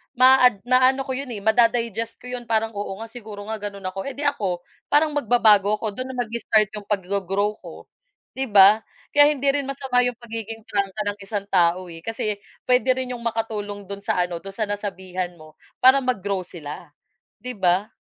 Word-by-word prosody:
maa-ad 255 -4 +5
maaano 255 +2 +3
ko 265 - -5
'yon, 270 +1 -3
eh, 230 -5 -5
mada-digest 230 0 +2
ko - - -9
'yon. 250 -1 -5
Parang, 225 0 +1
"oo 205 -2 -5
nga - - -8
siguro 215 -4 -9
nga 220 -1 -4
gano'n 200 -1 -7
ako" 195 - -7
eh, 275 - -5
'di 290 - -5
ako 190 -11 -1 0.2
parang 300 +1 +3
magbabago 215 -7 +4
ako, 215 0 -3
do'n 255 +5 -5
na 260 - -7
mag-i-start 220 -2 +1
'yong 210 -1 -8
pag-go-grow 200 +1 -1
ko, - - -11 0.5
'di 265 0 -3
ba? 205 0 +7 0.3
Kaya 290 0 +6
hindi 280 -2 0
rin 280 -1 -1
masama 265 -2 -1
'yong 245 -1 +1
pagiging 225 -2 -7
prangka 200 0 -2
ng 205 0 -3
isang 200 0 -4
tao, 180 0 +2
eh, 165 - -9
kasi 215 +2 -3 0.2
puwede 255 0 +3
rin 255 -1 -3
'yong 240 -2 -6
makatulong 210 -3 -3
do'n 200 - -5
sa 180 - +1
ano 175 -1 -4
do'n 195 +2 -10
sa 220 - -1
nasabihan 190 -3 -4
mo 155 -1 -17 0.2
para 260 +2 +8
mag-grow 200 -7 -2
sila 165 0 -9 0.5
'di 250 -2 -7
ba? 190 +2 +2
215 Hz, 190 wpm, -23 LUFS, 195-250 Hz, 0.5 s, para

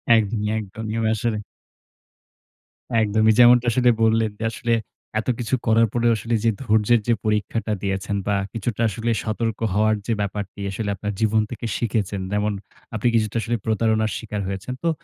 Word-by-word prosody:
একদমই, 105 -1 0
একদমই। 110 +1 -5
এবং 115 -1 +1
আসলে 110 0 -1 1.6
একদমই। 110 +1 +3
যেমনটা 120 0 +7
আসলে 125 +1 +3
বললেন 110 -1 +3
যে, - - -4
আসলে 120 +1 -1 0.5
এত 110 - -5
কিছু 120 +1 0
করার 115 +1 +5
পরেও 120 -1 +3
আসলে 115 +3 -3
যে 115 - +4
ধৈর্যের 110 0 +3
যে 120 - +4
পরীক্ষাটা 105 +1 0
দিয়েছেন। 95 +1 -2
বা 100 - +2 0.2
কিছুটা 115 0 -3
আসলে 115 +3 -2
সতর্ক 110 0 -2
হওয়ার 110 +2 +3
যে 115 - +2
ব্যাপারটি। 100 0 -4
আসলে 100 +2 -3
আপনার 105 +2 -4
জীবন 110 0 +3
থেকে 120 0 -6
শিখেছেন, 105 -4 -1
যেমন 105 +1 0 0.4
আপনি 110 +2 0
কিছুটা 110 -1 +1
আসলে 120 +2 -1
প্রতারণার 110 -1 +1
শিকার 105 -2 -4
হয়েছেন। 100 +6 -4
তো 170 - +2
110 Hz, 160 wpm, -23 LUFS, 105-115 Hz, 1.6 s, যেমনটা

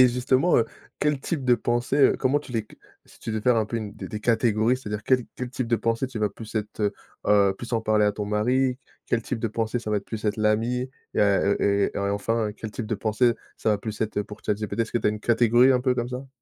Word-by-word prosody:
et 125 - +7
justement, 130 +7 +2
heu, 115 - +2 0.3
quel 150 -1 +2
type 140 +1 -3
de 125 - +6
pensée, 120 +3 -1
heu 140 - +5
comment 135 +2 +2
tu 145 -3 -11
les 115 - +1
c - - -17 0.3
si - - -19
tu - - -5
devais 110 -1 -1
faire 125 +1 +3
un 110 - +2
peu 115 +2 -3
une 105 -2 -6
des - - -7
des 105 - -6
catégories, 115 +1 +2
c'est-à-dire 105 -4 -5
quel 130 +2 +3
quel 125 -1 -4
type 130 -1 -3
de 115 0 +2
pensée 115 +4 0
tu 125 -4 -6
vas 105 -1 +1
plus 110 +2 -11
être, 105 0 -3
heu, 105 -1 +1 0.3
heu, 100 -2 +4
plus 120 - -8
en 115 - +2
parler 110 -1 +2
à 105 - +2
ton 105 0 -4
mari? 125 +5 +1 0.3
Quel 115 -1 0
type 125 +1 -3
de 115 0 -1
pensée 115 +2 -1
ça 110 -2 -5
va 105 - +2
être 100 - -3
plus 110 -2 -6
être 105 - 0
l'amie 115 +4 +1 0.2
et - - +2
à, 100 -1 +4
heu, 100 - +2
et 100 0 +2
et - - -2
enfin 105 +2 -1
quel 110 0 -7
type 115 - -5
de 110 - -1
pensée 110 +3 +2 0.2
ça 110 - 0
va 105 - +2
plus 110 0 -6
être 105 -1 -1
pour 105 +1 -12
ChatGPT? 105 +1 -2
Est-ce 115 - -1
que 120 - +2
tu - - -1
as - - +4
une 105 0 -5
catégorie 120 +3 +4
un 125 - +2
peu 130 0 +1
comme 120 -1 -2
ça? 130 +2 -6
115 Hz, 280 wpm, -25 LUFS, 105-125 Hz, 0.3 s, et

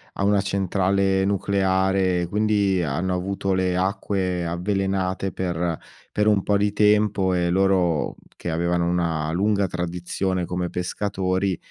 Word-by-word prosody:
a 100 - -1
una 100 -1 +3
centrale 95 0 +1
nucleare, 95 -2 +1
quindi 100 -1 +1
ha 70 -4 -2
hanno 95 +1 -1
avuto 95 +1 -1
le 90 -1 +1
acque 95 -2 -1
avvelenate 95 +2 -1
per 85 -2 -2 0.3
per 105 - +1
un 105 -2 +4
po' 100 - +2
di 100 0 0
tempo, 105 -2 +3
e 90 -1 +1
loro, 90 -4 +1 0.2
che - - -5
avevano 85 +1 0
una 85 -3 0
lunga 100 +3 +1
tradizione 90 +1 -2
come 90 0 -3
pescatori, 95 0 -1
95 Hz, 135 wpm, -23 LUFS, 90-100 Hz, 0.3 s, un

